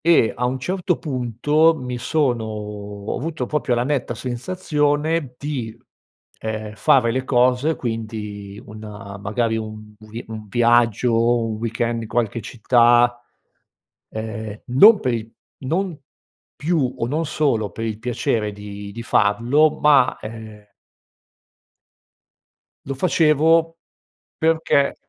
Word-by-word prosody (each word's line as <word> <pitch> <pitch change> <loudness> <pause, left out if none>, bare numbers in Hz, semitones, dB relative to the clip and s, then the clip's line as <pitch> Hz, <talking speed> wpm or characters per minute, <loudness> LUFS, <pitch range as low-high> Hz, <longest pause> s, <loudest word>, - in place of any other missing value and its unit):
e 160 -9 +4
a 125 - -2
un 130 +1 -2
certo 180 +3 -1
punto 145 +4 +1
mi 125 -2 -5
sono 125 -3 0
ho 105 -1 -6
avuto 155 -2 -3
proprio 145 -4 0
la 120 - +1
netta 125 -3 -1
sensazione 145 +2 -1
di, 125 -6 -5 0.6
ehm, 110 -1 -5
fare 120 +2 +3
le 130 +2 -1
cose 125 +4 +2
quindi 110 -4 -6
una 105 -2 -9
magari 110 +3 -1
un 110 -1 -7
vi 110 +2 -9
un 110 -1 -7
viaggio, 120 0 +3
un 110 -1 -3
weekend 115 +1 -2
di 115 - -6
qualche 115 -1 -1
città, 120 +1 +3 0.9
ehm, 110 -1 -6
non 200 - +7
per 125 -2 0
il 115 -1 -4 0.3
non 165 +4 -2 0.6
più 150 -6 0
o, 115 - -1
non 155 +5 -1
solo, 125 -9 0
per 115 - -5
il 110 -1 -3
piacere 110 -2 -1
di 100 0 -8
di 115 +3 -7
farlo 120 +9 +2
ma 140 -4 +4
ehm 110 -1 -10 2.2
lo 135 - -3
facevo 165 +1 +3 0.6
perché 160 -3 +2
120 Hz, 120 wpm, -21 LUFS, 110-145 Hz, 2.2 s, non